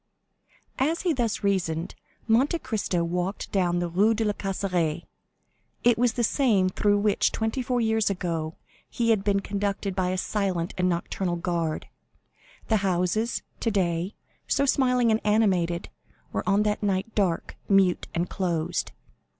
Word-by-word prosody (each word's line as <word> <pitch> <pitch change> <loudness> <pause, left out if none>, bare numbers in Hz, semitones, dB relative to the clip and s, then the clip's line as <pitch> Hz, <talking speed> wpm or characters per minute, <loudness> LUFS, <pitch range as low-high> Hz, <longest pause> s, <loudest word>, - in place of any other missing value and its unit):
As 310 +6 +1
he 350 -3 +2
thus 235 -6 -1
reasoned, 180 -4 0 0.3
Monte 255 +9 +3
Cristo 215 - -1
walked 180 +3 -3
down 180 -3 +1
the 175 0 0
Rue 200 +7 +3
de 225 0 0
la 210 - +1
Caisserie. 180 -6 -1 0.8
It 240 -1 +5
was 240 0 +2
the 240 - -1
same 215 -7 +3
through 205 +2 +2
which, 205 0 +2
twenty 220 +4 -1
four 250 0 0
years 220 -2 +2
ago, 165 -4 -2 0.3
he 230 -1 +1
had 210 -3 +2
been 200 -1 +2
conducted 200 -1 -2
by 185 -2 0
a 185 - -1
silent 185 -3 -1
and 180 0 +1
nocturnal 175 +1 -1
guard; 170 -2 -2 0.8
the 220 - +3
houses, 195 +4 0 0.2
today 185 -3 0 0.3
so 280 - +2
smiling 250 -3 +3
and 220 - +2
animated, 185 -6 +1 0.4
were 100 - 0
on 200 +2 +4
that 210 0 0
night 200 +1 -1
dark, 185 -5 0
mute, 195 -3 +3
and 170 +1 0
closed. 170 - -2
195 Hz, 150 wpm, -26 LUFS, 175-220 Hz, 0.8 s, It